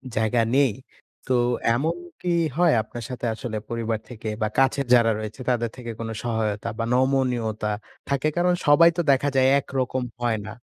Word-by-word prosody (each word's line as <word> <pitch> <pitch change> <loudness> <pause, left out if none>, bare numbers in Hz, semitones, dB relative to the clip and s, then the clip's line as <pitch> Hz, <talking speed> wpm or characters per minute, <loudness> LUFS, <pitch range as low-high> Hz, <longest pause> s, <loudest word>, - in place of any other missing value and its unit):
জায়গা 110 +2 +2
নেই। 140 -3 +4 0.6
তো 130 - +1 0.4
এমন 150 +7 0 0.3
কি 180 - -2 0.3
হয় 175 0 +4
আপনার 120 +2 -8
সাথে 125 -1 -5
আসলে 110 0 -5
পরিবার 115 -1 -2
থেকে? 115 -3 -8
বা 110 - +2
কাছের 135 +1 +2
যারা 115 -2 +4
রয়েছে 110 +4 -7
তাদের 120 -2 +1
থেকে 120 -2 -7
কোনো 115 -1 -4
সহায়তা 110 -3 -2
বা - - 0
নমনীয়তা 125 -5 +1 0.4
থাকে? 140 +1 +1
কারণ 180 +1 +3
সবাই 165 +3 +7
তো - - +3
দেখা 140 +1 +2
যায় 130 0 +4
একরকম 130 -1 -2 0.2
হয় 115 -2 +1
না। 110 - -7
125 Hz, 170 wpm, -24 LUFS, 115-135 Hz, 0.6 s, সবাই